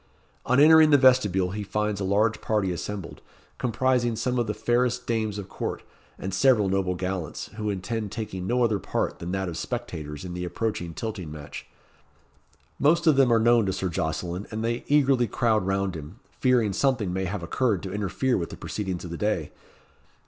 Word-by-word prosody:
On 125 Hz, +2 st, +4 dB
entering 155 Hz, +1 st, +8 dB
the 145 Hz, -, +7 dB
vestibule 105 Hz, -9 st, +4 dB
he 105 Hz, +2 st, -4 dB
finds 105 Hz, +1 st, -2 dB
a -, -, 0 dB
large 105 Hz, +3 st, +1 dB
party 105 Hz, -4 st, 0 dB
assembled, 95 Hz, +1 st, -6 dB, 0.4 s
comprising 125 Hz, 0 st, +1 dB
some 125 Hz, +2 st, -1 dB
of 120 Hz, -, 0 dB
the 105 Hz, -, -1 dB
fairest 125 Hz, +1 st, 0 dB
dames 110 Hz, -3 st, -1 dB
of 100 Hz, -2 st, -6 dB
court, -, -, -5 dB, 0.3 s
and 95 Hz, 0 st, -5 dB
several 105 Hz, -1 st, +4 dB
noble 95 Hz, -1 st, 0 dB
gallants, 90 Hz, -2 st, -4 dB
who 105 Hz, -1 st, -2 dB
intend 105 Hz, +2 st, -3 dB
taking 100 Hz, -5 st, -5 dB
no 125 Hz, +1 st, +2 dB
other 110 Hz, -4 st, +2 dB
part -, -, -2 dB
than 85 Hz, +1 st, -5 dB
that 95 Hz, -1 st, -1 dB
of 85 Hz, -2 st, -5 dB
spectators 85 Hz, -, -5 dB
in 90 Hz, -, -6 dB
the 90 Hz, 0 st, -4 dB
approaching 90 Hz, -2 st, -3 dB
tilting 105 Hz, -8 st, -5 dB
match. 75 Hz, -1 st, -9 dB, 1.1 s
Most 165 Hz, +4 st, +3 dB
of 155 Hz, -3 st, +5 dB
them 135 Hz, -3 st, +4 dB
are 115 Hz, -, +5 dB
known 115 Hz, -2 st, +4 dB
to 95 Hz, -, 0 dB
Sir 95 Hz, 0 st, -2 dB
Jocelyn, 85 Hz, +4 st, -3 dB
and 110 Hz, +1 st, -4 dB
they 120 Hz, +1 st, -1 dB
eagerly 135 Hz, -4 st, +3 dB
crowd 110 Hz, -6 st, +1 dB
round 95 Hz, -1 st, 0 dB
him, 80 Hz, +6 st, -9 dB, 0.2 s
fearing 120 Hz, -6 st, +3 dB
something 110 Hz, -6 st, +1 dB
may 95 Hz, +1 st, -1 dB
have 95 Hz, 0 st, -4 dB
occurred 100 Hz, +2 st, 0 dB
to 95 Hz, -1 st, -5 dB
interfere 105 Hz, +5 st, 0 dB
with 85 Hz, -, -4 dB
the -, -, -9 dB
proceedings 95 Hz, -4 st, -4 dB
of 85 Hz, -, -7 dB
the 85 Hz, -, -4 dB
day. 90 Hz, -8 st, -1 dB
105 Hz, 190 wpm, -26 LUFS, 95-120 Hz, 1.1 s, entering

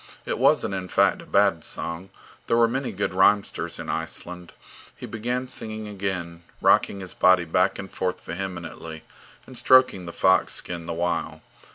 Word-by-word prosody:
It -, -, -2 dB
wasn't, -, -, +3 dB
in 95 Hz, -1 st, -4 dB
fact, -, -, +2 dB
a -, -, -14 dB
bad -, -, +3 dB
song. 85 Hz, +3 st, -5 dB, 0.4 s
There 115 Hz, -, +2 dB
were 115 Hz, 0 st, +5 dB
many 130 Hz, +3 st, -2 dB
good 100 Hz, -1 st, -2 dB
rhymesters 100 Hz, +2 st, +2 dB
in -, -, -7 dB
Iceland. 85 Hz, +2 st, -5 dB, 0.4 s
He -, -, -8 dB
began 120 Hz, +3 st, -3 dB
singing 110 Hz, -3 st, -4 dB
again, 95 Hz, -4 st, -4 dB, 0.2 s
rocking 100 Hz, -, +3 dB
his 95 Hz, -, -5 dB
body 90 Hz, -1 st, +4 dB
back 90 Hz, +3 st, +1 dB
and 95 Hz, -1 st, -8 dB
forth 90 Hz, -1 st, -2 dB
vehemently, 85 Hz, -3 st, -7 dB, 0.4 s
and 130 Hz, -, -12 dB
stroking 125 Hz, -7 st, +4 dB
the -, -, -5 dB
fox 95 Hz, +2 st, +3 dB
skin 85 Hz, -1 st, -4 dB
the 85 Hz, -, -3 dB
while. 85 Hz, +1 st, -2 dB
95 Hz, 165 wpm, -24 LUFS, 85-105 Hz, 0.4 s, were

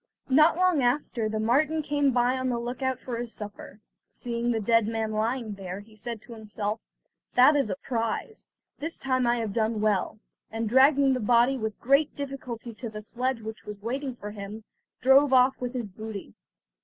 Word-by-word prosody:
Not 305 Hz, +5 st, +5 dB
long 365 Hz, -5 st, +3 dB
after 245 Hz, -3 st, 0 dB
the 215 Hz, 0 st, -2 dB
marten 300 Hz, +8 st, +2 dB
came 285 Hz, -1 st, +2 dB
by 250 Hz, 0 st, +2 dB
on 260 Hz, 0 st, -1 dB
the 240 Hz, -, 0 dB
look 240 Hz, +3 st, -5 dB
out 260 Hz, -1 st, 0 dB
for 245 Hz, -3 st, -5 dB
his 240 Hz, -1 st, -5 dB
supper. 210 Hz, -1 st, -9 dB, 0.3 s
Seeing 235 Hz, 0 st, -3 dB
the 230 Hz, -2 st, +1 dB
dead 230 Hz, 0 st, +3 dB
man 225 Hz, -1 st, -2 dB
lying 220 Hz, +1 st, -1 dB
there, 190 Hz, -1 st, -6 dB
he 215 Hz, +1 st, -18 dB
said 220 Hz, +1 st, -6 dB
to 240 Hz, -, -11 dB
himself: 215 Hz, -1 st, -4 dB, 0.6 s
"That 260 Hz, +4 st, +7 dB
is 275 Hz, -6 st, +1 dB
a 190 Hz, -, -1 dB
prize, 230 Hz, -, -3 dB, 0.3 s
this 320 Hz, +3 st, -3 dB
time 255 Hz, -2 st, 0 dB
I 240 Hz, -, +3 dB
have 225 Hz, -4 st, -3 dB
done 220 Hz, 0 st, 0 dB
well"; 210 Hz, -1 st, +1 dB, 0.3 s
and 225 Hz, 0 st, -3 dB
dragging 270 Hz, +3 st, +5 dB
the 255 Hz, -, -1 dB
body 240 Hz, +4 st, +4 dB
with 220 Hz, -4 st, -4 dB
great 275 Hz, +4 st, +3 dB
difficulty 255 Hz, -4 st, -6 dB
to 230 Hz, +2 st, -6 dB
the 215 Hz, 0 st, -8 dB
sledge 250 Hz, +2 st, -2 dB
which 220 Hz, 0 st, -8 dB
was 210 Hz, -1 st, -7 dB
waiting 260 Hz, +2 st, -3 dB
for 210 Hz, -3 st, -7 dB
him, 210 Hz, +1 st, -8 dB, 0.4 s
drove 270 Hz, +2 st, +5 dB
off 255 Hz, +1 st, +4 dB
with 245 Hz, 0 st, -3 dB
his 245 Hz, -4 st, -3 dB
booty. 205 Hz, -, -8 dB
235 Hz, 190 wpm, -27 LUFS, 220-265 Hz, 0.6 s, That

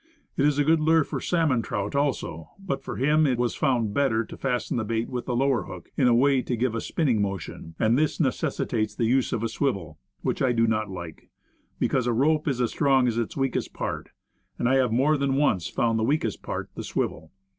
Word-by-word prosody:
It 140 Hz, -, +2 dB
is 145 Hz, -1 st, +1 dB
a 145 Hz, -, +3 dB
good 160 Hz, +2 st, +3 dB
lure 160 Hz, +1 st, +4 dB
for -, -, -5 dB
sal 170 Hz, -2 st, +1 dB
mon 130 Hz, -6 st, +2 dB
trout 100 Hz, -2 st, -3 dB
also; 130 Hz, -, -1 dB
but, 195 Hz, -8 st, -4 dB
for -, -, -6 dB
him 150 Hz, +4 st, +3 dB
it 125 Hz, -3 st, +1 dB
was 120 Hz, -1 st, 0 dB
found 115 Hz, -6 st, 0 dB
better 115 Hz, -5 st, +1 dB
to -, -, -10 dB
fasten 125 Hz, -2 st, -2 dB
the 110 Hz, -, 0 dB
bait 115 Hz, +1 st, -1 dB
with 125 Hz, -1 st, -4 dB
the 125 Hz, -, -1 dB
lower 135 Hz, -1 st, +1 dB
hook -, -, -10 dB
in 130 Hz, -, +3 dB
a 120 Hz, -, +5 dB
way 135 Hz, +1 st, +4 dB
to 125 Hz, -, -2 dB
give 120 Hz, 0 st, 0 dB
it -, -, -2 dB
a -, -, -2 dB
spinning 130 Hz, -10 st, 0 dB
motion; 95 Hz, -4 st, -5 dB
and 110 Hz, +2 st, +3 dB
this 155 Hz, +2 st, +1 dB
necessitates 115 Hz, -6 st, -1 dB
the 115 Hz, -, 0 dB
use 130 Hz, +3 st, +2 dB
of 115 Hz, -, -1 dB
a -, -, +1 dB
swivel, 100 Hz, -, -2 dB, 0.2 s
which -, -, -1 dB
I 130 Hz, -2 st, +3 dB
do 115 Hz, -1 st, +3 dB
not 110 Hz, -2 st, 0 dB
like; 85 Hz, -4 st, -8 dB, 0.5 s
because, 125 Hz, -2 st, 0 dB
"a 120 Hz, -, +2 dB
rope 150 Hz, +6 st, +2 dB
is 135 Hz, -4 st, 0 dB
as 120 Hz, -2 st, +1 dB
strong 135 Hz, -4 st, +3 dB
as 115 Hz, -1 st, 0 dB
its 115 Hz, -, -3 dB
weakest 135 Hz, -2 st, -1 dB
part;" -, -, -4 dB, 0.5 s
and 120 Hz, -, 0 dB
I 135 Hz, +1 st, +4 dB
have 130 Hz, -3 st, +2 dB
more 140 Hz, +6 st, +3 dB
than 140 Hz, -1 st, 0 dB
once 135 Hz, -, +2 dB
found 115 Hz, -1 st, 0 dB
that -, -, 0 dB
weakest 135 Hz, -6 st, 0 dB
part -, -, -5 dB
the -, -, -6 dB
swivel. 80 Hz, 0 st, -3 dB
125 Hz, 235 wpm, -26 LUFS, 110-140 Hz, 0.5 s, a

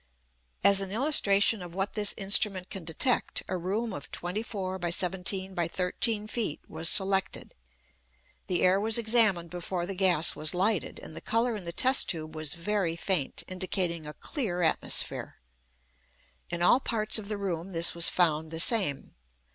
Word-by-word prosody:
As 200 Hz, 0 st, +4 dB
an 195 Hz, -, -4 dB
illustration 215 Hz, -5 st, +2 dB
of 175 Hz, -1 st, -10 dB
what 195 Hz, +1 st, -2 dB
this 210 Hz, -2 st, 0 dB
instrument 195 Hz, -2 st, +2 dB
can 195 Hz, -, -6 dB
detect, 170 Hz, -, 0 dB
a 185 Hz, -, -3 dB
room 200 Hz, +5 st, -3 dB
of 145 Hz, -, -8 dB
24 190 Hz, 0 st, -4 dB
by 175 Hz, -1 st, -3 dB
17 190 Hz, +2 st, -1 dB
by 175 Hz, -2 st, -1 dB
13 205 Hz, +5 st, -2 dB
feet 215 Hz, -9 st, -2 dB
was 160 Hz, +1 st, +1 dB
selected. 195 Hz, -1 st, 0 dB, 0.9 s
The 180 Hz, -2 st, -1 dB
air 185 Hz, +2 st, +3 dB
was 220 Hz, +1 st, +2 dB
examined 220 Hz, -7 st, +2 dB
before 175 Hz, 0 st, -4 dB
the 195 Hz, -, -5 dB
gas 180 Hz, -4 st, +3 dB
was 155 Hz, +2 st, 0 dB
lighted, 195 Hz, +1 st, -1 dB
and 155 Hz, -, -11 dB
the -, -, -8 dB
colour 230 Hz, +1 st, -1 dB
in 200 Hz, -4 st, -8 dB
the 170 Hz, -, -4 dB
test 260 Hz, +9 st, +4 dB
tube 155 Hz, -2 st, -3 dB
was 155 Hz, -1 st, -4 dB
very 175 Hz, -1 st, -1 dB
faint, 170 Hz, -4 st, -1 dB
indicating 180 Hz, -3 st, -3 dB
a 150 Hz, -, -7 dB
clear 190 Hz, -, -4 dB
atmosphere. 160 Hz, -, 0 dB, 1.1 s
In 175 Hz, 0 st, -3 dB
all 240 Hz, -, +5 dB
parts 220 Hz, -4 st, -1 dB
of 205 Hz, -, -9 dB
the 210 Hz, -, -3 dB
room 185 Hz, -3 st, -4 dB
this 170 Hz, -2 st, +6 dB
was 170 Hz, -1 st, +3 dB
found 160 Hz, -3 st, 0 dB
the 160 Hz, 0 st, -5 dB
same. 185 Hz, -, +2 dB
185 Hz, 165 wpm, -28 LUFS, 170-210 Hz, 1.1 s, this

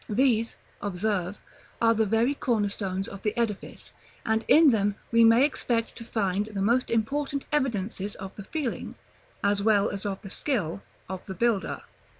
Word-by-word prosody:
These, 230 Hz, 0 st, +2 dB, 0.3 s
observe, 200 Hz, -1 st, -1 dB, 0.4 s
are 230 Hz, 0 st, +4 dB
the 220 Hz, -1 st, +1 dB
very 225 Hz, +6 st, +2 dB
corner 225 Hz, -7 st, 0 dB
stones 195 Hz, -1 st, -3 dB
of 200 Hz, -, -9 dB
the 215 Hz, +2 st, -2 dB
edifice, 225 Hz, -4 st, -3 dB, 0.3 s
and 220 Hz, 0 st, +1 dB
in 310 Hz, -2 st, +7 dB
them 205 Hz, -2 st, +1 dB, 0.2 s
we 230 Hz, 0 st, +6 dB
may 230 Hz, +4 st, +7 dB
expect 235 Hz, -5 st, -1 dB
to -, -, -7 dB
find 205 Hz, -3 st, -1 dB
the 205 Hz, -3 st, -4 dB
most 240 Hz, +5 st, +2 dB
important 275 Hz, +5 st, -1 dB
evidences 210 Hz, -7 st, -1 dB
of 190 Hz, 0 st, -8 dB
the 205 Hz, -, -9 dB
feeling, 285 Hz, 0 st, -4 dB, 0.5 s
as 200 Hz, 0 st, +2 dB
well 205 Hz, -1 st, +3 dB
as 200 Hz, -1 st, -4 dB
of 200 Hz, -2 st, -3 dB
the 195 Hz, -, -8 dB
skill, 200 Hz, -, -1 dB, 0.3 s
of 190 Hz, -1 st, -6 dB
the 190 Hz, -, -5 dB
builder. 225 Hz, 0 st, 0 dB
215 Hz, 165 wpm, -27 LUFS, 200-235 Hz, 0.5 s, in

